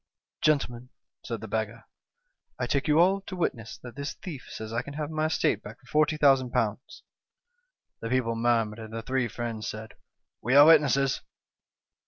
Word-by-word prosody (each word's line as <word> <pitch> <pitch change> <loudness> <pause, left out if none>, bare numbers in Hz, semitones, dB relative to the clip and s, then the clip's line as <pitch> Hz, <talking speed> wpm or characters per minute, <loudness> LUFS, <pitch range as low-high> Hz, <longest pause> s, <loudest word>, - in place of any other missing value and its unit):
"'Gentlemen,' 125 -5 +1 0.3
said 115 -3 -5
the 110 - -6
beggar, 110 +1 -3 0.8
'I - - 0
take 140 +1 0
you 150 0 +4
all 190 +3 +4
to 190 -1 -7
witness 115 -10 -3
that 120 -1 -9
this 140 +1 -5
thief 155 -8 -8
says 110 0 -7
I 120 - 0
can 140 +3 -9
have 150 0 -3
my 155 0 0
estate 155 -8 +1
back 105 +3 -10
for 150 +4 +3
^40,000.' 130 -6 +1 0.5
" 485 +1 -51
The 115 - -4
people 125 -2 +1
murmured, 115 -1 +1
and 110 -1 -8
the 115 0 -5
three 130 +1 0
friends 115 -2 -5
said: 110 -1 -7 0.3
' - - -60
We 125 +4 +1
are 145 +1 +10
witnesses.' 140 -4 +4
125 Hz, 175 wpm, -27 LUFS, 115-150 Hz, 0.8 s, are